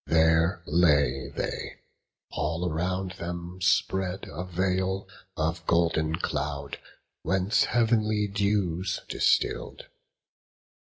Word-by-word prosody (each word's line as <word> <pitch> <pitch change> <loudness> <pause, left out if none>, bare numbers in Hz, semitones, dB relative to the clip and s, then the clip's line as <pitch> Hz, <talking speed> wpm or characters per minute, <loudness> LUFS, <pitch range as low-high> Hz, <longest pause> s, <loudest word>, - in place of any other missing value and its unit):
There 80 +2 +3
lay 70 -5 +3
they, - - -4 0.6
all 85 +4 -1
around 90 +3 -2
them 85 +1 -6
spread 90 +2 +1
a 80 +4 -5
veil 95 +1 -1 0.3
Of 80 +1 -2
golden 80 -2 +2
cloud, 70 -3 -3 0.4
whence 95 +1 +2
heav'nly 110 -2 +2
dews 100 -3 0
distill'd. - - 0
90 Hz, 90 wpm, -27 LUFS, 80-95 Hz, 0.6 s, There